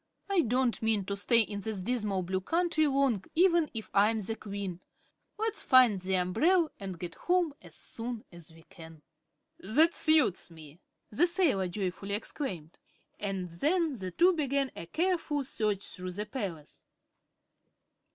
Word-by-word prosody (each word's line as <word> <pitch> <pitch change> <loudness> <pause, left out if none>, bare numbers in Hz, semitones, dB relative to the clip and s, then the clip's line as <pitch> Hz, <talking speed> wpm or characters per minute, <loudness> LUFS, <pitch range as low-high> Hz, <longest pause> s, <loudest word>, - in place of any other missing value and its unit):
I 395 -3 +3
don't 250 -2 0
mean 220 -3 +1
to 200 - -3
stay 230 +4 +4
in 205 -2 -3
this 215 -1 -3
dismal 205 -2 -1
Blue 185 +1 -2
Country 330 - +1
long, 270 -8 +1
even 340 -2 +4
if 220 -2 -6
I 200 +2 +5
am 225 -1 -1
the 215 +2 -3
Queen. 200 -4 -6 0.6
Let's 440 +1 -2
find 250 -7 +5
the 190 +1 -1
umbrel 315 - +2
and 190 -3 -6
get 170 0 -6
home 355 -4 0
as 170 -3 -13
soon 230 +3 -4
as 170 -2 -12
we 165 0 -17
can." 160 -3 -14 0.6
"That 305 - +3
suits 305 - +3
me," 160 -1 -13 0.3
the 300 +12 +3
sailor 335 - +2
joyfully 195 +2 -3
exclaimed, 190 - -6 0.4
and 195 -3 -3
then 305 - 0
the 185 -1 -4
two 350 - +4
began 280 -4 0
a 170 - -8
careful 325 - 0
search 210 -6 -2
through 180 0 -6
the 205 +3 -4
palace. 195 - -7
215 Hz, 155 wpm, -30 LUFS, 185-295 Hz, 0.6 s, I